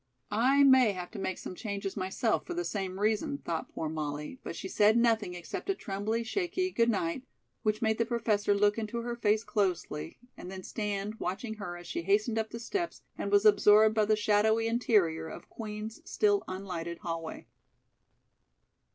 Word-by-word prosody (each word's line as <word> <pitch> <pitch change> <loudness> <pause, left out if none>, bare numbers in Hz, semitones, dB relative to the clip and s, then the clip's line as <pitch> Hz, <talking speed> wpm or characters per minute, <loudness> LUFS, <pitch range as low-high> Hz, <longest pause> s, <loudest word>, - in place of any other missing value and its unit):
"I 260 +7 +4
may 260 -5 +6
have 180 -1 -6
to 210 - -7
make 190 - -2
some - - -7
changes 200 -1 -4
myself 200 +4 -1
for 350 - -4
the 350 0 -2
same 190 -2 -3
reason," 220 +8 +1
thought 165 - -4
poor 160 - -4
Molly, 150 - -4
but - - -5
she - - -5
said 210 +3 +4
nothing 225 -6 +2
except 175 - -6
a 390 - +2
trembly, 210 - -2
shaky 370 - -1
"good 235 -5 +2
night," 195 0 0 0.4
which 215 +1 0
made 220 0 +1
the 230 - +3
Professor 215 -4 +1
look 205 +2 +3
into 225 +2 -3
her 240 0 -3
face 215 -2 +2
closely 180 -7 -2 0.2
and 180 - -9
then 190 0 -7
stand 210 +1 -3
watching 205 +5 -3
her 175 -4 -5
as 175 - -11
she - - -3
hastened 215 +5 +2
up 220 0 -2
the 230 - -7
steps 345 - -3
and - - -3
was 405 +1 +4
absorbed 215 - +6
by 215 -1 +3
the 215 +1 +3
shadowy 215 +1 +3
interior 205 -9 +2
of - - -10
Queen's 215 0 -6
still 410 -2 +2
unlighted 180 -3 -5
hallway. 165 -1 -5
215 Hz, 180 wpm, -30 LUFS, 190-230 Hz, 0.4 s, may